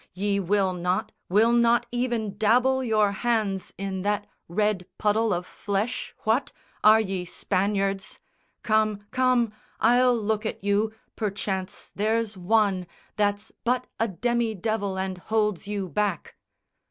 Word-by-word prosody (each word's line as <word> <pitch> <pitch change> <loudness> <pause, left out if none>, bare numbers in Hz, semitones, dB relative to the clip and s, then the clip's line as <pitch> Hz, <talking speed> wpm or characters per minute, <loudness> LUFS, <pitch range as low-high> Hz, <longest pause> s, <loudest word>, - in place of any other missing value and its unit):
Ye 200 +1 0
will 195 0 +1
not, 180 +1 -1 0.2
will 215 +5 +4
not 235 0 +4
even 240 -4 -1
dabble 250 +5 +3
your 215 -4 +3
hands 205 -3 -1
In 195 -1 -3
that 205 +1 0 0.2
red 200 0 0
puddle 215 +1 +2
of 175 0 -1
flesh, 205 +7 -3
what? 225 +5 +1 0.3
Are 215 +1 +8
ye 190 -4 -2
Spaniards? 195 +2 -1 0.4
Come, 215 -2 +1
come, 255 -3 +2 0.3
I'll 245 0 +4
look 215 0 -1
at 220 - -4
you, 205 +2 +2 0.2
perchance 195 -3 -3
there's 220 +1 0
one 190 -1 +1 0.3
That's 205 0 0
but 250 +1 +1
a 225 - +2
demi 235 +2 0
devil 205 -1 -2
and 190 -1 -3
holds 210 -1 0
you 205 -2 -2
back." 205 -1 -2
210 Hz, 130 wpm, -26 LUFS, 195-225 Hz, 0.4 s, Are